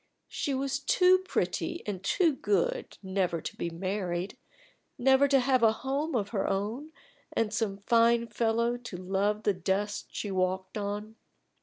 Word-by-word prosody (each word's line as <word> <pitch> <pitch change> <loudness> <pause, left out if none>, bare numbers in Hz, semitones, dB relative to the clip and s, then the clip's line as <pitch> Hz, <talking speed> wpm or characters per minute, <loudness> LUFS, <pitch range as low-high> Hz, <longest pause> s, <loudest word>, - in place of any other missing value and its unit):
She 280 - -2
was 275 +1 -1
too 365 +5 +4
pretty 370 -2 -2
and 195 -3 -4
too 330 - +3
good 205 -8 -1
never 190 -3 0
to 160 - -6
be 170 - -3
married 185 +1 -3 0.6
never 265 +2 +5
to 275 -1 +4
have 255 0 +2
a 225 -1 +5
home 275 +5 -2
of 205 -4 0
her 205 -4 -1
own 215 +10 -2 0.4
and 220 -2 0
some 220 -3 -1
fine 235 0 +4
fellow 235 +1 0
to 235 -6 -8
love 195 +3 -1
the 205 - +3
dust 195 +3 -2
she 205 - -4
walked 185 0 -1
on. 210 +1 -4
215 Hz, 155 wpm, -29 LUFS, 195-260 Hz, 0.6 s, never